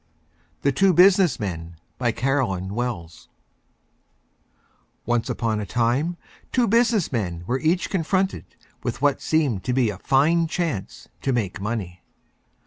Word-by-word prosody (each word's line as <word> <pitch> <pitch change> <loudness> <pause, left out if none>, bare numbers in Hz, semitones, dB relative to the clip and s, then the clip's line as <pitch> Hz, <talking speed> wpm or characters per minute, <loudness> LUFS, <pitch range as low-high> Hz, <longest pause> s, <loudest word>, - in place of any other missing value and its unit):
THE 140 - +3
TWO 190 +7 +3
BUSINESS 180 -2 +5
MEN 85 -4 -5 0.2
BY 120 -3 +1
CAROLYN 115 -9 -1
WELLS 105 -9 -5 1.8
Once 120 -1 0
on 110 -2 -1
a 105 - -3
Time 125 - 0 0.3
two 245 -2 +2
Business 230 -3 +2
Men 90 -9 -2
were 125 +7 -1
Each 165 +5 +1
Confronted 185 - -1 0.4
with - - -4
what 145 -1 +2
seemed 145 -11 +1
to 125 - 0
be 125 -4 +2
a 95 - -9
Fine 160 +5 +3
Chance 160 - -3
to 135 - 0
Make 105 -6 -2
Money. 100 -5 -4
125 Hz, 135 wpm, -23 LUFS, 105-165 Hz, 1.8 s, BUSINESS